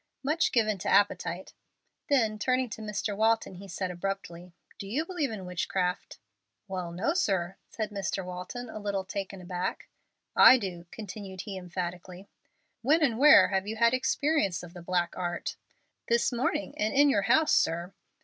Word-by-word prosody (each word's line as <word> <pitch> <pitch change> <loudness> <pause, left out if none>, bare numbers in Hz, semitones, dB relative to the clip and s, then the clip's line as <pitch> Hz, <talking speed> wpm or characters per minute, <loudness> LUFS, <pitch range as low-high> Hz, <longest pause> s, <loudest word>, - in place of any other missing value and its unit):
"Much 305 +4 +1
given 215 -4 +1
to - - -3
appetite." 190 -2 +1 0.6
Then, 225 -7 +2
turning 255 +1 0
to 220 - -6
Mr. 210 -1 -3
Walton, 220 -1 +1
he 195 +2 -10
said, 185 0 -3
abruptly, 180 -1 -5 0.3
"Do 195 - -6
you 275 +11 -1
believe 340 -6 -2
in 210 -4 -6
witchcraft?" 180 0 -2 0.5
"Well, 185 -3 -4
no, 195 - 0
sir," 190 - 0
said 215 -2 -4
Mr. 195 -1 -3
Walton, 180 +7 -6
a 220 - -7
little 200 -2 -2
taken 195 0 -5
aback. 180 0 -4 0.5
"I 260 - +9
do!" 180 -6 -6
continued 195 -3 -7
he, 200 - -7
emphatically. 180 +1 -6 0.5
"When 305 +7 +3
and 240 -5 +1
where 300 +2 +8
have 195 0 -1
you 220 - -3
had 230 +1 +4
experience 255 - +1
of 175 -1 -11
the 175 - -9
black 175 0 -1
art?" 175 -1 -3 0.5
"This 235 +2 +2
morning, 235 -5 -1
and 215 +4 0
in 290 +1 +6
your 240 -8 +3
house, 315 -1 +4
sir." 170 +3 +1
200 Hz, 165 wpm, -29 LUFS, 180-230 Hz, 0.6 s, I